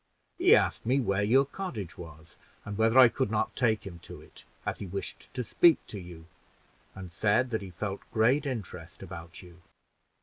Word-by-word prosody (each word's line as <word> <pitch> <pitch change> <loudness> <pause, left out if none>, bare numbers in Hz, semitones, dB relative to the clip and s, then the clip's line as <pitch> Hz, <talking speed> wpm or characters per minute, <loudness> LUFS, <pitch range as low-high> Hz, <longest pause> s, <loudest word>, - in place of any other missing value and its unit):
He - - +7
asked - - +1
me 130 +4 +2
where 100 -5 0
your 130 +7 +4
cottage 135 - -6
was, 80 -1 -12 0.3
and 100 - -5
whether 115 +3 +2
I 130 -2 +10
could 125 -1 -2 0.2
take 110 -4 +1
him 85 -3 -9
to - - -11
it, - - -16 0.2
as - - -3
he 100 - -6
wished 100 +2 -6
to 125 - -2
speak 165 +7 +5
to 105 - -7
you, 85 -3 -11 0.7
and 95 -2 -9
said 110 +7 +1
that 110 - -1
he 95 - -8
felt 95 +2 -5
great 125 +7 +2
interest 115 -8 -6
about 85 +3 -9
you." 90 0 -16
105 Hz, 180 wpm, -29 LUFS, 90-125 Hz, 0.7 s, I